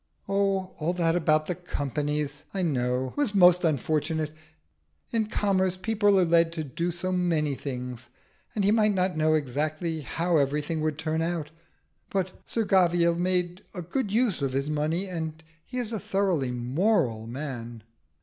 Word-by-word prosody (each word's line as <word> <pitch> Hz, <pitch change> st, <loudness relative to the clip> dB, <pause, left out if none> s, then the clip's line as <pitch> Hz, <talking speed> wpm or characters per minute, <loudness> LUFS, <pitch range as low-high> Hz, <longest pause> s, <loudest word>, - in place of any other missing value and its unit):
"Oh, 195 Hz, -1 st, 0 dB
all 160 Hz, +3 st, 0 dB
that 170 Hz, -2 st, +1 dB
about 155 Hz, -2 st, +3 dB
the 180 Hz, -, -1 dB
Companies, 150 Hz, -3 st, -3 dB
I 190 Hz, -, 0 dB
know, 125 Hz, -4 st, 0 dB
was 270 Hz, -8 st, 0 dB
most 180 Hz, -2 st, +6 dB
unfortunate. 155 Hz, +1 st, 0 dB, 0.8 s
In 225 Hz, -2 st, +1 dB
commerce 190 Hz, -3 st, +1 dB
people 205 Hz, -1 st, +3 dB
are 180 Hz, -, +4 dB
led 165 Hz, 0 st, +4 dB
to 160 Hz, -2 st, -3 dB
do 165 Hz, +5 st, -2 dB
so 175 Hz, +2 st, -2 dB
many 165 Hz, -5 st, +1 dB
things, 125 Hz, -3 st, -6 dB, 0.5 s
and 205 Hz, -, +1 dB
he 205 Hz, -, +5 dB
might 215 Hz, -2 st, +3 dB
not 180 Hz, -1 st, +1 dB
know 155 Hz, 0 st, +3 dB
exactly 155 Hz, +3 st, -1 dB
how 165 Hz, +6 st, 0 dB
everything 150 Hz, +3 st, 0 dB
would 155 Hz, -1 st, -1 dB
turn 160 Hz, 0 st, -1 dB
out. 165 Hz, -2 st, -2 dB, 0.6 s
But 190 Hz, -1 st, -1 dB, 0.2 s
Sir 225 Hz, -2 st, -1 dB
Gavial 175 Hz, -3 st, +4 dB
made 180 Hz, +1 st, 0 dB
a 180 Hz, -, -4 dB
good 205 Hz, -, -2 dB
use 225 Hz, -, +1 dB
of 135 Hz, -2 st, -1 dB
his 140 Hz, +3 st, -1 dB
money, 155 Hz, +5 st, 0 dB
and 160 Hz, -3 st, -5 dB, 0.2 s
he 255 Hz, -, -7 dB
is 240 Hz, -3 st, -2 dB
a 220 Hz, -, -2 dB
thoroughly 190 Hz, -11 st, 0 dB
moral 125 Hz, -, 0 dB
man." 120 Hz, -3 st, -6 dB
165 Hz, 160 wpm, -27 LUFS, 150-185 Hz, 0.8 s, most